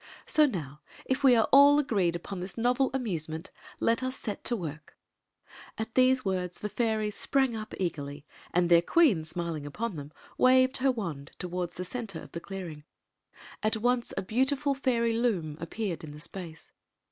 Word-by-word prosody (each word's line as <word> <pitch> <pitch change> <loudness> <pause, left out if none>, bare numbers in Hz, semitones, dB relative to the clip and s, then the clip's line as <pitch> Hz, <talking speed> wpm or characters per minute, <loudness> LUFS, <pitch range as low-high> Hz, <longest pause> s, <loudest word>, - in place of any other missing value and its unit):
So 305 -1 +4
now, 150 - -5 0.2
if 260 +1 -1
we 260 -3 +7
are 225 - +3
all 285 +1 +8
agreed 200 -12 +1
upon 180 +2 -6
this 185 +3 -6
novel 250 +3 +2
amusement, 165 -11 -3 0.3
let 230 +2 +2
us 255 0 -2
set 210 -6 -5
to 240 - +1
work." 155 -7 -7 0.8
At 220 +1 -4
diese 255 -1 +4
words 180 -2 -2
the 210 - -4
Juries 215 -1 0
sprang 265 +1 +1
up 215 -1 -6
eagerly; 145 -5 -4 0.3
and 175 0 +2
their 170 -1 +6
queen, 210 - +3
smiling 160 -3 -4
upon 210 +5 -4
them, 145 0 -8 0.3
waved 255 +1 +5
her 265 +1 +3
wand 165 - -5
toward 180 -1 -3
the 180 - -5
center 215 -5 -5
of - - -12
the 170 - -5
clearing. 170 -5 -7 0.8
At 215 +1 +1
once 245 +2 +1
a - - -1
beau 225 +7 +2
tiful 285 +1 +1
fairy 235 -4 +1
loom 205 -10 0
appeared 180 +1 -4
in 150 -2 -8
the 150 - -10
space. 165 -1 -8
210 Hz, 175 wpm, -29 LUFS, 170-250 Hz, 0.8 s, all